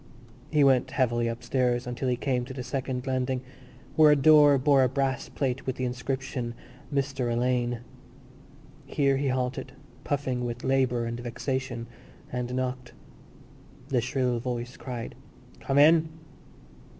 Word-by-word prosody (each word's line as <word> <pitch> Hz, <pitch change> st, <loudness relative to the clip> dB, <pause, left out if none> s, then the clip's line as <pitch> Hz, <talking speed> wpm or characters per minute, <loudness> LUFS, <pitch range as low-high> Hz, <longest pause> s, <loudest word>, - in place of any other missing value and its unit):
He 150 Hz, -2 st, +3 dB
went 135 Hz, -2 st, +4 dB
heavily 120 Hz, -3 st, +1 dB
upstairs 120 Hz, +1 st, 0 dB
until 125 Hz, +1 st, -2 dB
he 125 Hz, -, +2 dB
came 125 Hz, -1 st, -1 dB
to 130 Hz, +1 st, -8 dB
the 130 Hz, -, -4 dB
second 130 Hz, -1 st, -3 dB
landing, 130 Hz, -1 st, -1 dB, 0.5 s
where 155 Hz, -1 st, +7 dB
a -, -, +6 dB
door 145 Hz, 0 st, +6 dB
bore 135 Hz, +1 st, +4 dB
a 130 Hz, -, +3 dB
brass 135 Hz, -1 st, -1 dB
plate 135 Hz, -2 st, -2 dB
with 130 Hz, -, -1 dB
the 130 Hz, -, -2 dB
inscription 125 Hz, -1 st, -3 dB, 0.4 s
Mr 135 Hz, -3 st, -1 dB
Alleyne. 120 Hz, 0 st, 0 dB, 1.1 s
Here 140 Hz, -2 st, +2 dB
he 140 Hz, +1 st, -1 dB
halted, 130 Hz, -1 st, -2 dB, 0.3 s
puffing 130 Hz, -3 st, -1 dB
with 120 Hz, 0 st, -4 dB
labour 130 Hz, -3 st, +1 dB
and 115 Hz, +1 st, -4 dB
vexation, 120 Hz, 0 st, -3 dB, 0.5 s
and 125 Hz, 0 st, -3 dB
knocked. 130 Hz, -1 st, -3 dB, 1.0 s
The 130 Hz, -4 st, +2 dB
shrill 125 Hz, -1 st, 0 dB
voice 120 Hz, 0 st, -4 dB
cried: 120 Hz, -3 st, -6 dB, 0.5 s
"Come 135 Hz, -, -1 dB
in!" 160 Hz, +2 st, +6 dB
130 Hz, 140 wpm, -27 LUFS, 125-135 Hz, 1.1 s, where